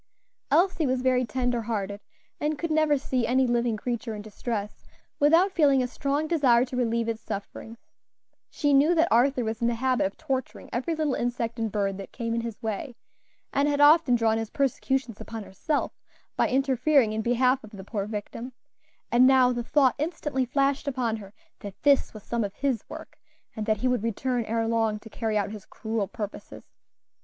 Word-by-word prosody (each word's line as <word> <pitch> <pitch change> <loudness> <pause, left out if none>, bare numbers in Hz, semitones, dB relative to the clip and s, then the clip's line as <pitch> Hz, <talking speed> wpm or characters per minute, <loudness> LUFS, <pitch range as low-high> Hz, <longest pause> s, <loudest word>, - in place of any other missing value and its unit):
Elsie 345 -4 +3
was 255 0 0
very 255 -1 +2
tender 245 0 -1
hearted, 205 -3 -3 0.4
and 300 0 -1
could 335 +2 -3
never 310 -2 +3
see 260 -3 -1
any 260 +2 +3
living 240 -2 +1
creature 235 -1 -3
in 205 - -7
distress 215 -1 -5 0.3
without 330 +7 +5
feeling 280 -7 +3
a - - -1
strong 280 +4 -1
desire 260 -7 +4
to 255 - -7
relieve 235 -2 0
its 225 -1 -3
sufferings. 220 +3 -7 0.7
She 290 -2 0
knew 295 +5 +5
that 330 +1 +4
Arthur 250 +2 +3
was 220 0 -3
in 235 - +2
the 235 - +1
habit 255 -3 +1
of 195 - -11
torturing 265 -5 -4
every 265 +8 -1
little 305 -3 0
insect 235 -1 -2
and 225 -2 -1
bird 200 -2 -1
that 195 - -8
came 230 -1 -3
in 230 - 0
his 230 -2 -6
way, 225 +4 -4 0.6
and 280 +1 +2
had 290 -1 0
often 290 -3 +6
drawn 225 -1 +2
his 225 -1 -4
persecutions 265 -3 -1
upon 225 -1 -6
herself 285 - -2 0.4
by - - +2
interfering 265 -2 +2
in 220 - -1
behalf 250 +3 +2
of 215 - -11
the 200 -3 -10
poor 200 0 -4
victim; 225 +4 -6 0.6
and 245 +2 +6
now 260 -2 +5
the 240 -1 -2
thought 265 0 +3
instantly 295 -4 -1
flashed 275 +3 0
upon 250 -5 -1
her 200 -2 -11 0.3
that 200 -2 -9
this 285 -2 +4
was 215 -2 -11
some 235 -1 -1
of 200 -1 -5
his 265 -6 -1
work, - - -10 0.4
and 215 0 -4
that 215 -1 +2
he 255 - 0
would 250 -3 +1
return 235 +2 -1
ere 225 +1 -1
long 225 -2 +1
to 220 +1 -13
carry 220 -1 -1
out 205 0 -1
his 210 -2 -9
cruel 220 -2 -3
purposes. 210 0 -7
245 Hz, 190 wpm, -26 LUFS, 220-275 Hz, 0.7 s, often